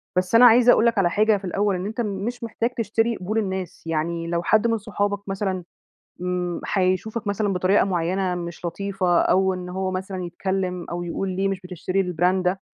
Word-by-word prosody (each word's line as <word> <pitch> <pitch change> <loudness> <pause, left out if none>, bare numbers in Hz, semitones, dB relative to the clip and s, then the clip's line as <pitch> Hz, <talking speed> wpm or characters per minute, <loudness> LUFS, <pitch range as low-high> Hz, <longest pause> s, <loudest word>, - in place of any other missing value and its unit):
بس 185 +4 +1
أنا 245 +2 +9
عايزة 245 +1 +7
أقول 230 - +4
لك 230 - +2
على 180 -3 +3
حاجة 215 +2 +3
في 195 - -9
الأوّل، 200 +2 0
إن 180 +1 -4
أنت 220 +3 -3
مش 215 +3 -3
محتاج 230 +1 -1
تشتري 225 +1 0
قبول 205 +5 -3
الناس، 190 -4 -3
يعني 165 +1 -2
لو 170 0 -1
حد 220 +5 +3
من 230 - +1
صحابك 205 -1 -3
مثلًا 190 -2 -2 0.6
م 180 -1 -2
هيشوفك 195 +4 0
مثلًا 205 0 0
بطريقة 185 +2 +3
معيّنة 180 0 0
مش 170 -1 -6
لطيفة، 185 0 0
أو 190 0 +2
إن 180 0 -6
هو 190 +1 -2
مثلًا 185 0 -4
يتكلّم 180 0 -3
أو 175 0 -3
يقول 175 +3 -3
ليه 195 +1 +1
مش 195 -1 -3
بتشتري 185 +1 -2
الbrand 180 +3 +2
ده، 185 +2 0
190 Hz, 195 wpm, -23 LUFS, 180-205 Hz, 0.6 s, أنا